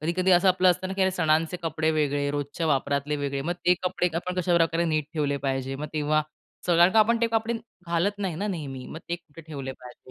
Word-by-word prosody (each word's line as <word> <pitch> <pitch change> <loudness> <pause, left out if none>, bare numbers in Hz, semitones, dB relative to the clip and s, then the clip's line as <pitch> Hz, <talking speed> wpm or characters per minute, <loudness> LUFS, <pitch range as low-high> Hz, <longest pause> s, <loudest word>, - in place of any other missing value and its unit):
कधी-कधी 175 +4 +1
असं 180 +1 +5
आपलं 185 0 +5
असतं 185 +2 -2
ना, 190 - -3
की 195 - -3
अरे 190 - +3
सणांचे 165 -1 +1
कपडे 160 0 0
वेगळे, 145 -2 0
रोजच्या 145 +3 -3
वापरातले 140 0 0
वेगळे, 140 -1 -2
मग 170 - -1
ते 180 - +6
कपडे 180 0 +1
आपण 180 +1 -3
कशाप्रकारे 170 -1 +2
नीट 155 -2 0
ठेवले 145 -2 0
पाहिजे? 135 0 -1
मग 150 - -4
तेव्हा 155 0 +1 0.4
सगळ्यां 175 +1 +5
कारण 225 +1 +5
का - - -10
ते 230 - +3
कपडे 225 +1 -1 0.3
घालत 175 +5 0
नाही 190 -5 -2
ना 200 +5 -2
नेहमी, 140 -9 -5
मग 160 - -7
ते 170 - -1
कुठे 165 -2 -15
ठेवले 140 -4 -6
पाहिजे, 125 0 -14
165 Hz, 220 wpm, -26 LUFS, 145-180 Hz, 0.4 s, ते